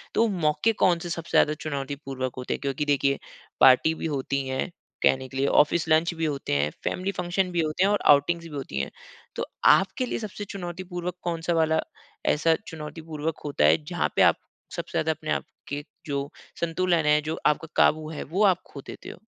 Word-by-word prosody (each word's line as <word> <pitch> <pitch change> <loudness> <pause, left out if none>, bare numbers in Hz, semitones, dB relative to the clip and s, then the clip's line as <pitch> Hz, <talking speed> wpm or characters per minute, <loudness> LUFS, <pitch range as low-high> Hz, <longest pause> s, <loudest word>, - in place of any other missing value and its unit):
तो 230 - +4
मौके 180 +3 +1
कौन 175 -2 +4
से 175 0 -6
सबसे 170 0 -5
ज़्यादा 150 - +4
चुनौतीपूर्वक 135 -3 -4
होते 125 - -3
हैं - - -5
क्योंकि 140 +1 -2
देखिए 140 -1 +2 0.4
पार्टी 130 +5 +7
भी - - -5
होती 135 0 -2
हैं 130 +6 -2 0.3
कहने 130 0 +3
के 135 - -7
लिए, 140 - +2
ऑफ़िस 160 +3 +3
लंच 160 +2 +3
भी 165 0 -2
होते 140 - -2
हैं, 75 +1 +1
फ़ेेमिली 190 +2 -1
फ़ंक्शन 180 0 -1
भी 170 -1 +1
होते 155 +4 0
हैं 200 - +4
और 205 - +2
आउटिंगस 165 +4 +3
भी - - -9
होती 125 - -4
हैं। - - -3 0.4
तो - - -2 0.2
आपके 195 +7 +4
लिए - - -3
सबसे 210 -1 -6
चुनौतीपूर्वक 180 -1 -5
कौन-सा 170 0 -1
वाला 160 -1 +2 0.5
ऐसा 160 +2 +3
चुनौतीपूर्वक 160 -1 -5
होता 140 - +1
है 75 0 +4
जहाँ - - -1
पे - - +3
आप - - +6 0.4
सबसे - - -5
ज़्यादा - - +2
अपने - - -6
आप - - 0
आपके 145 +1 -7 0.2
जो 140 -1 -2 0.3
संतुलन 170 -1 +1
है, 150 0 +4
जो 155 +2 -4
आपका 155 +2 +1
काबू 155 0 +3
है 155 - -5
वो 190 +8 0
आप 185 -2 +3
खो 140 - -8
देते - - -9
हो? - - -10
155 Hz, 200 wpm, -26 LUFS, 140-175 Hz, 0.5 s, पार्टी